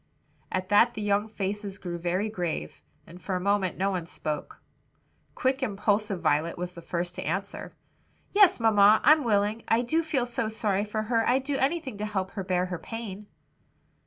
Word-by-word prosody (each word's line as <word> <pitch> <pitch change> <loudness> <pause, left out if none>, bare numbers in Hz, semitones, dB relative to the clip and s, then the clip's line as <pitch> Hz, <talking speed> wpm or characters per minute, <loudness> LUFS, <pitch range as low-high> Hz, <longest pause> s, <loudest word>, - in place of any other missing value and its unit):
At 185 0 -2
that 230 +4 +5
the 215 - -4
young 205 +1 +1
faces 200 -1 -4
grew 175 -3 -5
very 180 +5 0
grave, 180 -6 -4 0.2
and 175 +2 -13
for 190 - -3
a - - 0
moment 195 -1 0
no 195 +2 +1
one 180 -3 -3
spoke. 155 -3 -5 0.8
Quick, 260 +1 0
impulsive 205 -3 0
Violet 155 +2 +1
was 180 0 -4
the 170 - -10
first 175 +1 -3
to - - -5
answer. 190 +5 -4 0.6
"Yes, 395 -5 +6
mamma, 215 -2 +5
I'm 305 0 +6
willing; 210 0 +1
I 230 +2 +3
do 320 +7 +1
feel 305 -6 -1
so 235 -2 -2
sorry 210 -2 0
for 215 +1 -2
her 225 0 +1
I'd 260 +2 +2
do 285 +1 -2
anything 270 -5 -1
to 210 - -2
help 190 -2 -2
her 195 - -4
bear 180 -1 0
her 180 -2 -5
pain." 210 -3 -7
205 Hz, 185 wpm, -27 LUFS, 185-225 Hz, 0.8 s, Yes